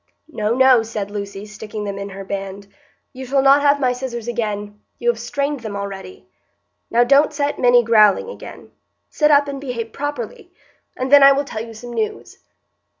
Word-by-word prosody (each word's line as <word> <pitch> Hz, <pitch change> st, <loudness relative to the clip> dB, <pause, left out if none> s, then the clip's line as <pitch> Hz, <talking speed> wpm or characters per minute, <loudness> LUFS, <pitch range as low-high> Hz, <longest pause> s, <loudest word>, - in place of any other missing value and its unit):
"No, 215 Hz, +2 st, -1 dB
no," 260 Hz, -2 st, +5 dB
said 215 Hz, -3 st, -5 dB
Lucy, 200 Hz, -1 st, -6 dB
sticking 215 Hz, 0 st, -8 dB
them 200 Hz, -1 st, -5 dB
in 200 Hz, 0 st, -6 dB
her 195 Hz, 0 st, -8 dB
band, 195 Hz, 0 st, -6 dB, 0.5 s
"you 260 Hz, 0 st, -8 dB
shall 270 Hz, +1 st, +1 dB
not 275 Hz, +1 st, +6 dB
have 285 Hz, 0 st, +3 dB
my 255 Hz, -2 st, +1 dB
scissors 245 Hz, -2 st, -6 dB
again,—you 210 Hz, -, -5 dB
have 475 Hz, -, +2 dB
strained 285 Hz, 0 st, -3 dB
them 220 Hz, -3 st, -7 dB
already. 200 Hz, -, -8 dB, 0.6 s
Now 235 Hz, +1 st, +3 dB
don't 275 Hz, +5 st, +4 dB
set 290 Hz, -1 st, -2 dB
Minny 245 Hz, -1 st, +5 dB
growling 215 Hz, -, +4 dB
again. 480 Hz, -, -11 dB, 0.4 s
Sit 300 Hz, -1 st, +2 dB
up 285 Hz, -1 st, +4 dB
and 275 Hz, -1 st, -6 dB
behave 235 Hz, -4 st, -5 dB
properly, 290 Hz, -, -6 dB, 0.5 s
and 255 Hz, +1 st, -3 dB
then 285 Hz, 0 st, +8 dB
I 275 Hz, 0 st, +8 dB
will 280 Hz, +1 st, -1 dB
tell 220 Hz, -5 st, -5 dB
you 225 Hz, -1 st, -11 dB
some 240 Hz, +2 st, -9 dB
news." 430 Hz, -, -4 dB
240 Hz, 180 wpm, -19 LUFS, 210-280 Hz, 0.6 s, then